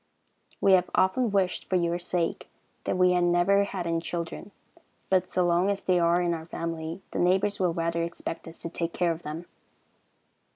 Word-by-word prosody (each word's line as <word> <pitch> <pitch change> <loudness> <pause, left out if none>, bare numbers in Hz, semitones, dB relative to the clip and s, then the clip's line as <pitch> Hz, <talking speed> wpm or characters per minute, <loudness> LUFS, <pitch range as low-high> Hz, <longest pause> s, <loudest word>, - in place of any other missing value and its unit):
We 195 - +5
have 180 -1 +4
often 190 +6 +2
wished, 190 -2 0
for 185 - +1
your 170 -1 +1
sake, 175 -1 -2 0.4
that - - 0
we 180 0 +5
had 180 -1 +2
never 175 +3 +3
had 185 -3 -4
any 165 0 0
children; 170 +3 -5 0.6
but 185 -1 +2
so 180 - +1
long 175 +3 +2
as 200 -1 -1
they 180 -1 +2
are 170 +1 +3
in 175 -1 +1
our 160 -1 -6
family, 165 +2 -5
the - - -3
neighbors 190 +3 +2
will 180 -2 +2
rather 170 0 -1
expect 170 -1 -5
us 165 - -8
to 170 - -6
take 170 -1 -3
care 175 -1 +1
of 165 0 -5
them. 160 +2 -6
175 Hz, 195 wpm, -27 LUFS, 170-185 Hz, 0.6 s, We